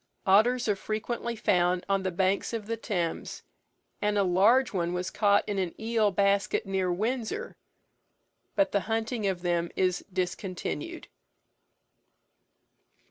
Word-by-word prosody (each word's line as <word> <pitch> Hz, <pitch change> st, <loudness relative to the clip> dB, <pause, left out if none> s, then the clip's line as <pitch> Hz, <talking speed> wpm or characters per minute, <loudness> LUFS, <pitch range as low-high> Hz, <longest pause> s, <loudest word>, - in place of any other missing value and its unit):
Otters 230 Hz, +6 st, +4 dB
are 210 Hz, -, +2 dB
frequently 235 Hz, +3 st, -3 dB
found 180 Hz, -4 st, +1 dB
on 195 Hz, -1 st, +1 dB
the 190 Hz, -, -1 dB
banks 190 Hz, +4 st, 0 dB
of 225 Hz, -3 st, -3 dB
the 230 Hz, +2 st, -2 dB
Thames, 180 Hz, -7 st, -3 dB, 0.6 s
and 210 Hz, 0 st, +1 dB
a 200 Hz, -, +4 dB
large 210 Hz, +9 st, +4 dB
one 175 Hz, -2 st, -1 dB
was 180 Hz, +1 st, -3 dB
caught 205 Hz, -1 st, +3 dB
in 205 Hz, -2 st, -1 dB
an 180 Hz, -3 st, -3 dB
eel 220 Hz, -1 st, +2 dB
basket, 200 Hz, +1 st, +1 dB
near 190 Hz, -2 st, 0 dB
Windsor, 240 Hz, -, -2 dB, 1.0 s
but 295 Hz, -1 st, +2 dB
the 200 Hz, -, +2 dB
hunting 225 Hz, -1 st, -1 dB
of 185 Hz, -2 st, -2 dB
them 175 Hz, -1 st, 0 dB
is 185 Hz, -1 st, +1 dB
discontinued. 185 Hz, -, -4 dB
200 Hz, 135 wpm, -28 LUFS, 185-225 Hz, 1.0 s, Otters